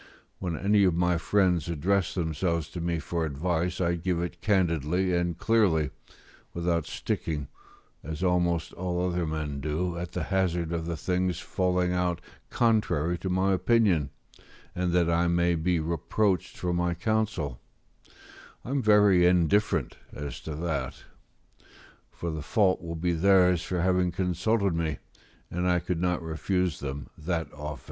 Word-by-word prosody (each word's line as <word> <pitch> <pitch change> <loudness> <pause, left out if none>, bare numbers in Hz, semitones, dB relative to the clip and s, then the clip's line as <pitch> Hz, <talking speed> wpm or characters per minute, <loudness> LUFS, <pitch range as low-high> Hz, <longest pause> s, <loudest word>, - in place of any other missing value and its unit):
When 85 -4 -3
any 100 +3 +3
of 90 -3 +2
my 90 -1 +2
friends 90 -3 +2
address 90 +3 0
themselves 85 -1 -1
to 85 - -6
me 85 0 0
for 85 +1 -2
advice, 85 +4 -1
I 85 -2 +1
give 85 0 -1
it 85 0 -4
candidly 90 -2 +1
and 85 -1 -1
clearly, 85 -10 +2 0.6
without 85 -2 0
sticking, 75 -4 -3 0.5
as 80 +4 -5
almost 85 -2 +1
all 90 0 -1
other 90 -2 -1
men 75 -2 -3
do, 85 +4 -2
at 85 0 -6
the - - -2
hazard 90 -4 0
of 85 -1 -2
the 85 -1 -3
thing's 90 +2 -1
falling 90 -1 0
out 90 -1 0 0.3
contrary 90 -8 +1
to 95 - -3
my 95 +1 +2
opinion, 95 - +2 0.6
and 90 0 -1
that 90 -1 +3
I 85 +1 +2
may 85 0 +2
be 85 +1 +1
reproached 85 +4 -1
for 90 -1 -1
my 85 0 0
counsel; 100 - -1 1.1
I 125 - -5
am 140 -1 +1
very 105 -5 +5
indifferent 90 - +2
as 70 +1 -6
to 80 - -6
that, 75 -5 -3 1.1
for 85 - -5
the 80 -1 -4
fault 95 +4 +2
will 85 -1 -5
be 85 +2 0
theirs 90 0 +4
for 90 -1 -2
having 90 0 +2
consulted 95 +3 0
me, 80 -2 -1 0.5
and 90 +1 0
I 90 - +3
could 85 0 -2
not 90 -1 0
refuse 85 +1 -1
them 70 -2 -6
that 80 +1 -3
office. 75 0 -6
85 Hz, 155 wpm, -27 LUFS, 80-90 Hz, 1.1 s, very